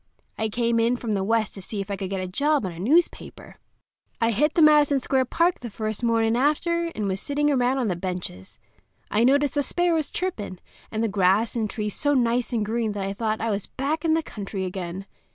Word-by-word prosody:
I 220 Hz, 0 st, -1 dB
come 235 Hz, +1 st, +1 dB
in 230 Hz, +2 st, +2 dB
from 235 Hz, -2 st, -4 dB
the 195 Hz, -2 st, 0 dB
West 220 Hz, +1 st, +1 dB
to 195 Hz, -, -8 dB
see 205 Hz, +2 st, -5 dB
if 195 Hz, +1 st, -4 dB
I -, -, 0 dB
could 190 Hz, -1 st, -5 dB
get 195 Hz, -1 st, -2 dB
a -, -, -4 dB
job 285 Hz, +6 st, +1 dB
on 185 Hz, -, -3 dB
a 165 Hz, -, -10 dB
newspaper. 305 Hz, -, 0 dB, 0.6 s
I 230 Hz, -1 st, +2 dB
hit 295 Hz, +8 st, +1 dB
the 335 Hz, -, +4 dB
Madison 295 Hz, -2 st, +5 dB
Square 260 Hz, 0 st, +1 dB
Park 340 Hz, +7 st, +1 dB
the 240 Hz, -, -6 dB
first 215 Hz, +1 st, -4 dB
mornin' 230 Hz, -1 st, +2 dB
after, 335 Hz, +6 st, +1 dB
and 210 Hz, -2 st, -2 dB
was 190 Hz, 0 st, -1 dB
sitting 295 Hz, +4 st, 0 dB
around 255 Hz, -1 st, +2 dB
on 250 Hz, -4 st, 0 dB
the 185 Hz, -, 0 dB
benches. 175 Hz, -, -6 dB, 0.5 s
I 215 Hz, -, +3 dB
noticed 280 Hz, +3 st, +3 dB
the 290 Hz, -, +1 dB
sparrows 330 Hz, +1 st, +1 dB
chirpin', 230 Hz, -, -4 dB, 0.3 s
and 220 Hz, +1 st, -1 dB
the -, -, +2 dB
grass 200 Hz, +3 st, +2 dB
and 220 Hz, -3 st, -1 dB
trees 210 Hz, -2 st, -3 dB
so 290 Hz, 0 st, +1 dB
nice 245 Hz, -1 st, +1 dB
and 225 Hz, -3 st, 0 dB
green 220 Hz, 0 st, -1 dB
that 200 Hz, -1 st, -3 dB
I 195 Hz, -, -2 dB
thought 220 Hz, +1 st, -2 dB
I 225 Hz, 0 st, 0 dB
was 200 Hz, -1 st, -2 dB
back 295 Hz, +4 st, -2 dB
in 320 Hz, -1 st, +3 dB
the 325 Hz, -, 0 dB
country 195 Hz, -6 st, -5 dB
again. 185 Hz, 0 st, -5 dB
230 Hz, 225 wpm, -25 LUFS, 200-285 Hz, 0.6 s, Madison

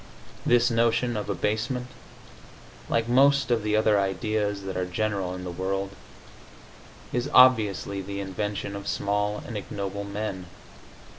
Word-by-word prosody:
This 120 Hz, 0 st, +4 dB
notion 115 Hz, +1 st, +2 dB
of 105 Hz, -1 st, -3 dB
abasement, 110 Hz, +5 st, -1 dB, 1.0 s
like 115 Hz, 0 st, +1 dB
most 135 Hz, +2 st, +4 dB
of 115 Hz, -2 st, +2 dB
the 105 Hz, 0 st, 0 dB
other 110 Hz, -1 st, +4 dB
ideas 100 Hz, +1 st, -1 dB
that 95 Hz, 0 st, -5 dB
are 90 Hz, 0 st, -1 dB
general 95 Hz, -1 st, -2 dB
in 90 Hz, -, -7 dB
the 90 Hz, -, -5 dB
world, 95 Hz, +2 st, -2 dB, 1.2 s
is 125 Hz, +3 st, -1 dB
obviously 110 Hz, -6 st, +5 dB
the 100 Hz, +1 st, -5 dB
invention 100 Hz, +1 st, -3 dB
of 100 Hz, 0 st, -7 dB
small 105 Hz, +1 st, -1 dB
and 115 Hz, -, -7 dB
ignoble 100 Hz, 0 st, -4 dB
men. 100 Hz, -2 st, -4 dB
105 Hz, 135 wpm, -26 LUFS, 100-115 Hz, 1.2 s, obviously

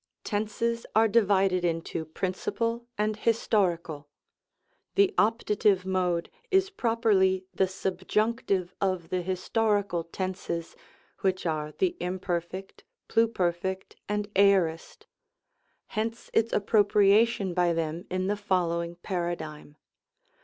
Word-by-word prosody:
Tenses 225 Hz, +2 st, -2 dB
are 225 Hz, +1 st, +6 dB
divided 195 Hz, -4 st, +3 dB
into 165 Hz, -1 st, -2 dB
principal 230 Hz, +8 st, -2 dB
and 210 Hz, 0 st, 0 dB
historical 175 Hz, -10 st, 0 dB, 0.9 s
The 400 Hz, 0 st, +4 dB
Optative 210 Hz, -3 st, +2 dB
mode 180 Hz, -2 st, 0 dB, 0.2 s
is 385 Hz, 0 st, +3 dB
properly 210 Hz, -, +2 dB
the 190 Hz, -, +2 dB
Subjunctive 190 Hz, 0 st, -1 dB
of 185 Hz, -4 st, -1 dB
the 185 Hz, -1 st, -1 dB
historical 195 Hz, 0 st, 0 dB
tenses, 170 Hz, -1 st, -4 dB, 0.4 s
which 185 Hz, -1 st, 0 dB
are 155 Hz, -2 st, -2 dB
the 360 Hz, -2 st, 0 dB
Imperf., 180 Hz, +1 st, -4 dB, 0.3 s
Pluperfect 190 Hz, -4 st, 0 dB, 0.2 s
and 210 Hz, 0 st, -1 dB
Aorist; 190 Hz, -5 st, +2 dB, 0.8 s
hence 225 Hz, +1 st, -4 dB
its 225 Hz, 0 st, +2 dB
appropriation 205 Hz, 0 st, +3 dB
by 175 Hz, -1 st, +2 dB
them 165 Hz, +2 st, -2 dB
in 185 Hz, 0 st, -1 dB
the 205 Hz, +2 st, +1 dB
follow 180 Hz, -4 st, 0 dB
ing 170 Hz, 0 st, -6 dB
Paradigm. 170 Hz, -5 st, -4 dB
190 Hz, 105 wpm, -28 LUFS, 175-215 Hz, 0.9 s, are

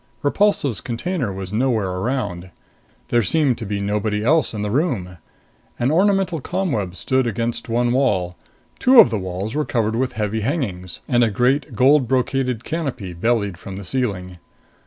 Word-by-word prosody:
Repulsive's 145 Hz, -, +1 dB
container 125 Hz, -, -3 dB
was 95 Hz, 0 st, -6 dB
nowhere 110 Hz, -5 st, +1 dB
around. 95 Hz, -3 st, -3 dB, 0.6 s
There 120 Hz, -, +3 dB
seemed 135 Hz, -, +1 dB
to 110 Hz, -, -5 dB
be 100 Hz, 0 st, -2 dB
nobody 105 Hz, +1 st, -1 dB
else 155 Hz, +7 st, +3 dB
in 105 Hz, -2 st, -4 dB
the 105 Hz, -, -2 dB
room. 110 Hz, -, -1 dB, 0.6 s
An 120 Hz, +3 st, +1 dB
ornamental 190 Hz, -2 st, +2 dB
ComWeb 135 Hz, -, -2 dB
stood 130 Hz, +5 st, 0 dB
against 115 Hz, +2 st, -3 dB
one 120 Hz, +1 st, +1 dB
wall. 95 Hz, -10 st, +1 dB, 0.4 s
Two 255 Hz, -1 st, +6 dB
of -, -, +8 dB
the 110 Hz, -, -1 dB
walls 95 Hz, +4 st, -4 dB
were 150 Hz, -, 0 dB
covered 110 Hz, -5 st, -1 dB
with 130 Hz, +2 st, -1 dB
heavy 105 Hz, 0 st, -2 dB
hangings, 105 Hz, -, -3 dB
and 120 Hz, -1 st, +3 dB
a 115 Hz, -, +3 dB
great 125 Hz, +4 st, 0 dB
gold 135 Hz, +2 st, +4 dB
brocaded 130 Hz, -1 st, 0 dB
canopy 135 Hz, -, -4 dB
bellied 100 Hz, -1 st, 0 dB
from 95 Hz, -1 st, -8 dB
the 100 Hz, 0 st, -7 dB
ceiling. 90 Hz, -7 st, -3 dB
115 Hz, 160 wpm, -21 LUFS, 100-135 Hz, 0.6 s, of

